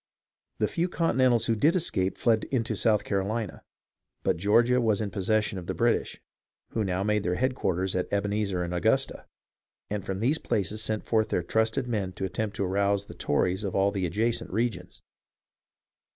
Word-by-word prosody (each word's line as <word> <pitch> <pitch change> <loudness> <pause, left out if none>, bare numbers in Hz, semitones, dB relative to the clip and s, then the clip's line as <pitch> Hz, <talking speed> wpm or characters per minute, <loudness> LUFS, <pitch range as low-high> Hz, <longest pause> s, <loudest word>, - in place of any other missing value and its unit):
The - - +1
few 175 0 -1
Continentals 130 -9 +2
who 115 - +1
did 150 - +3
escape 95 - 0
fled 115 -2 +2
into 120 -4 -1
South 110 -3 +2
Carolina; 105 +3 -2 0.6
but - - +2
Georgia 120 +7 +3
was 110 -3 +2
in 105 -2 -2
possession 100 +1 0
of 85 - -10
the - - -2
British, - - +1 0.5
who 110 - -1
now 95 -1 -1
made 105 0 +1
their 90 -1 -1
headquarters 95 -7 0
at 90 - -2
Ebenezer 100 -2 0
and 85 0 -4
Augusta, 90 - +1 0.6
and 105 -2 -2
from 95 0 -4
these 135 +9 +1
places 105 -1 -1
sent 110 -1 -2
forth 110 -1 +1
their 90 - 0
trusted 110 +6 0
men 100 -6 -2
to 95 - -3
attempt 100 +3 -3
to 100 - -1
arouse 100 +1 +1
the - - -10
Tories 90 +7 0
of 100 - -3
all 100 +1 +3
the 95 -3 -1
adjacent 110 +7 -1
regions. 95 -4 -3
105 Hz, 175 wpm, -27 LUFS, 95-115 Hz, 0.6 s, did